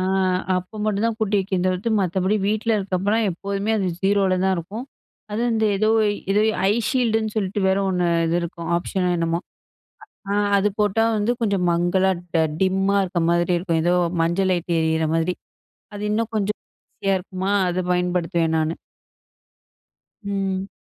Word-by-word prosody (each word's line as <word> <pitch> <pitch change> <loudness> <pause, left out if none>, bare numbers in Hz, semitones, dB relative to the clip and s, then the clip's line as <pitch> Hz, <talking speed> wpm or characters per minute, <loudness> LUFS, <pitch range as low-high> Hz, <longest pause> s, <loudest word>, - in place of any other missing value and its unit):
ஆ - - 0 0.5
அப்ப 185 +4 -6
மட்டும் 210 0 0
தான் 225 -1 -1
கூட்டி 210 -1 +1
வைக்கிறது 185 -1 -1
தவித்து 185 +5 -1
மற்றபடி 190 +3 +1
வீட்டில 215 +2 0
இருக்கப்போலாம் 200 +3 0
எப்போதுமே, 200 +4 -3
அது 190 - 0
0ல 195 -1 +2
தான் 190 0 +3
இருக்கும். 205 +9 -6 0.5
அது 215 - -2
வந்து 220 -1 +1
ஏதோ 215 +2 +1 0.4
ஏதோ 210 - +3 0.3
ஐ - - +4 0.2
ஷீல்டுன்னு 225 -4 0
சொல்லிட்டு 200 0 -1
வேற 190 +1 +2
ஒண்ணு 180 -1 +1 0.2
இது 165 +1 +1
இருக்கும். 170 -1 -6
ஆப்ஷன் 180 +2 -2
னோ - - +2
என்னமோ, 165 0 0 0.9
அ - - 0 0.2
அது 200 +1 +2
போட்டா 210 +2 +2
வந்து 210 +3 +1
கொஞ்சம் 200 -5 +1
மங்கலா 175 +3 +2 0.5
டிம்மா 195 +1 +2
இருக்கிற 175 -2 -1
மாதிரி 175 +1 +1
இருக்கும். 170 -2 0
ஏதோ 175 +1 +3 0.3
மஞ்ச 170 +3 0
லைட் 175 -1 -1
எரியிற 160 0 +1
மாரி. 165 +2 0 0.6
அது 205 0 -6
இன்னும் 225 +1 -1
கொஞ்சம் 210 0 -1 0.3
ஈஸியா 195 -1 0
இருக்குமா, 190 +1 -4 0.2
அதை 180 +1 -1
பயன்படுத்துவேன் 175 -2 0
நானு. 160 +1 0 1.5
ம். 195 -1 -2
190 Hz, 155 wpm, -22 LUFS, 175-205 Hz, 1.5 s, ஐ